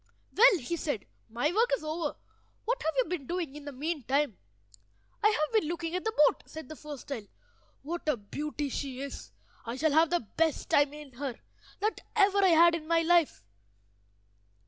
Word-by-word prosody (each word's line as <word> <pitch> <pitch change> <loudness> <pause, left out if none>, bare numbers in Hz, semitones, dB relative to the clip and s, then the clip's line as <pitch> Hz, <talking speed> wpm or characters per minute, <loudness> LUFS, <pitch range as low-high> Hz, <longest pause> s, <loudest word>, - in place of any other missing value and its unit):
"Well," 465 -2 +7
he 340 +4 -3
said, 290 -11 -3 0.2
"my 245 +9 0
work 460 +4 +3
is - - -13
over. 310 0 -2 0.5
What - - 0
have 320 - 0
you 260 - +4
been 315 -6 -4
doing 340 -5 -3
in 295 -1 -9
the 290 - -5
meantime?" 285 - -1 0.8
"I 425 - +5
have 305 -5 0
been 425 -9 +2
looking 335 0 -3
at 365 - -2
the 445 -6 -2
boat," - - +1
said 315 -4 -9
the 310 - -7
first 295 -3 -9
child. 230 -7 -5 0.6
"What 330 +1 -3
a 290 - +2
beauty 290 +7 -4
she 265 -1 -4
is! 280 0 -7 0.3
I 230 0 -5
shall 310 +3 +1
have 320 +2 +4
the 345 -10 -1
best 320 -2 +1
time 285 -1 +4
in 295 -3 -11
her 260 -1 -5 0.4
that 430 +2 -1
ever 400 0 +4
I - - +6
had 340 0 +6
in 320 -2 -4
my 335 0 +3
life." 335 - +3
310 Hz, 190 wpm, -30 LUFS, 280-345 Hz, 0.8 s, Well